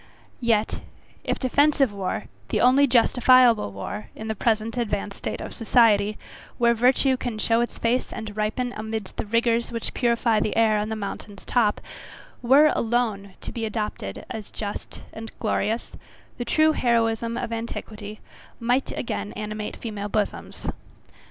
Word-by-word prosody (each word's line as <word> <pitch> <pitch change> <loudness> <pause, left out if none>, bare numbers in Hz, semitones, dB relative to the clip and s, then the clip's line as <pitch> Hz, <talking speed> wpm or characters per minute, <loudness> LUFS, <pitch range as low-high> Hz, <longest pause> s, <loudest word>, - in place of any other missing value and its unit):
Yet, 225 -3 +1 0.4
if - - -1
defensive 280 -2 +3
war, 195 -2 -3 0.3
the - - +1
only 265 +3 +5
justifiable 245 - +5
war, 150 - -6
in 220 0 -6
the - - +1
present 220 +1 0
advanced 205 -4 -2
state - - -4
of - - -6
society, 215 -3 +3 0.4
where 235 0 +4
virtue 255 +3 +3
can 245 -3 -4
show 230 +2 +2
its 240 - -3
face 240 +2 0
and 220 -3 -6
ripen 220 +4 -1
amidst 220 -2 -5
the - - -3
rigours 230 +1 +1
which 230 -1 -3
purify 235 -2 +2
the 210 - -1
air 220 -2 +4
on 210 +1 -2
the 220 - -2
mountain's 200 -1 -7
top, 220 -4 +2 0.6
were 280 +5 +6
alone 220 -5 -1
to - - -6
be 230 - -5
adopted 210 - -4
as 215 -2 -6
just 205 -1 -6
and 225 0 -7
glorious, 225 +1 -1 0.5
the 240 - -2
true 310 +5 +4
heroism 230 -3 +1
of 240 -2 -3
antiquity 215 -2 -6 0.4
might 245 +3 +1
again 210 - -3
animate 215 0 -5
female 210 -3 -5
bosoms. 210 0 -3
225 Hz, 150 wpm, -25 LUFS, 210-240 Hz, 0.6 s, were